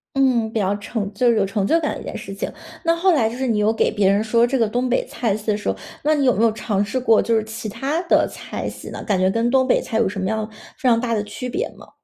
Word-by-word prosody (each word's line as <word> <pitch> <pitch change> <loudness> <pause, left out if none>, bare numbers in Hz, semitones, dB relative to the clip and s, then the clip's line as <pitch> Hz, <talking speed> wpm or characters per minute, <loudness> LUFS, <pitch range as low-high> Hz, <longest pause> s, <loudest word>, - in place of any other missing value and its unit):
嗯， 250 -5 +2
比 225 - -1
较 200 0 +1
成 205 -1 -4
就 240 +4 +2
是 230 - +3
有 200 - +3
成 195 0 -1
就 330 - +3
感 300 - -1
的 - - -8
一 - - -8
件 - - -6
事 195 - -8
情。 195 - -4 0.3
那 335 -1 +3
后 365 +2 +3
来 230 -8 +2
就 235 - -7
是 265 - -1
你 225 -4 +1
有 210 +1 +3
给 225 - +1
别 205 -3 +2
人 200 +2 +2
说 230 +2 +3
这 260 +2 0
个 230 -3 +2
东 245 +4 -1
北 250 - +1
菜 220 -4 -1
系 210 - -12
的 210 -1 +2
时 210 - -3
候， 95 - 0 0.3
那 305 +1 +3
你 285 -2 +1
有 250 - +5
没 215 - +1
有 230 - +5
尝 205 -2 -1
试 205 +6 -2
过 230 -3 +4
就 230 - +1
是 220 - +2
其 220 0 -6
它 270 +10 -2
的 340 - +3
菜 - - -6
系 - - -8
呢？ - - -7
感 200 -4 0
觉 185 0 +3
跟 230 +4 +1
东 260 0 +3
北 - - +4
菜 220 - -3
有 225 -4 +2
什 200 - -5
么 190 - -1
样 220 +1 -2 0.3
非 255 - +1
常 230 -1 +4
大 235 -1 -1
的 210 -2 0
区 210 +4 -6
别 385 - -2
吗？ - - -14
225 Hz, 340 characters per minute, -21 LUFS, 210-255 Hz, 0.3 s, 有